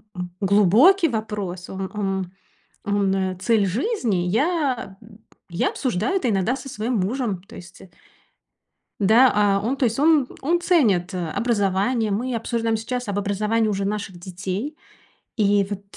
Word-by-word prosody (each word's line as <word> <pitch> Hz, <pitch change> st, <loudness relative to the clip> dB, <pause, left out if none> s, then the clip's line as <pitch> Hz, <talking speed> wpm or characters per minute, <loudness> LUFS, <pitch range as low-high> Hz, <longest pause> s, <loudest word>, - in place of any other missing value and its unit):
м, 180 Hz, -1 st, -5 dB
глубокий 210 Hz, -, +5 dB
вопрос. 205 Hz, -5 st, -4 dB
Он 190 Hz, 0 st, -5 dB
он 195 Hz, -3 st, -2 dB, 0.5 s
он- 195 Hz, -2 st, 0 dB
цель 220 Hz, -3 st, +2 dB
жизни. 225 Hz, -, -1 dB
Я 260 Hz, -, 0 dB
б 215 Hz, -, -16 dB, 0.4 s
я 170 Hz, +1 st, 0 dB
обсуждаю 245 Hz, -, -1 dB
это 270 Hz, -10 st, 0 dB
иногда 205 Hz, +4 st, +1 dB
со 270 Hz, -, -9 dB
своим 235 Hz, +1 st, -3 dB
мужем. 205 Hz, -2 st, -2 dB
То -, -, -15 dB
есть, 175 Hz, +1 st, -12 dB
э 185 Hz, -, -15 dB, 1.1 s
Да, 225 Hz, +6 st, +6 dB
а, 205 Hz, -1 st, +3 dB
он 250 Hz, +5 st, -1 dB
то 270 Hz, -, 0 dB
есть 230 Hz, +1 st, 0 dB
он 300 Hz, -2 st, +4 dB
он 340 Hz, +5 st, +1 dB
ценит, 215 Hz, -, +2 dB
э, 175 Hz, -3 st, -3 dB
образование. 215 Hz, +1 st, 0 dB
Мы 240 Hz, +5 st, -2 dB
обсуждаем 230 Hz, 0 st, -1 dB
сейчас 245 Hz, +2 st, -4 dB
об 200 Hz, 0 st, -1 dB
образовании 210 Hz, +2 st, 0 dB
уже 200 Hz, -1 st, -1 dB
наших 200 Hz, -3 st, -4 dB
детей. 190 Hz, -, -5 dB, 0.6 s
И 205 Hz, -2 st, +3 dB
вот 200 Hz, -1 st, -5 dB
210 Hz, 150 wpm, -22 LUFS, 190-245 Hz, 1.1 s, Да